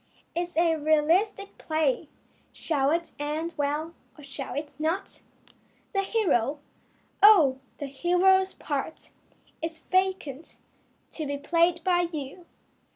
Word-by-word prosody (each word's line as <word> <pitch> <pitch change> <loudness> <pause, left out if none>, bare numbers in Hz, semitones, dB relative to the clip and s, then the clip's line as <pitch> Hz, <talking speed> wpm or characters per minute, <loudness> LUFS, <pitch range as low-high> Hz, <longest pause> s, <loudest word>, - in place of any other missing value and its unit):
It 340 - 0
is 350 -1 -6
a 330 -1 +3
realistic 325 +7 +1
play. 310 -1 0 0.4
Shall 280 -4 0
it 335 +2 -1
end 310 +3 -3
well 295 +3 -2 0.2
or 295 - -13
shall 275 -1 -6
it 290 +1 -5
not? 330 +6 -2 0.7
The 390 - +2
hero? 320 - +1 0.6
Oh, 330 -11 +7 0.2
the 285 - -5
hero's 360 +7 +2
part 290 +1 -5 0.5
Is 325 0 -4
vacant 370 -4 -1 0.5
to 310 -3 -5
be 285 0 -2
played 335 +3 +2
by 350 -1 +2
you. 310 +3 -7
320 Hz, 120 wpm, -27 LUFS, 290-355 Hz, 0.7 s, Oh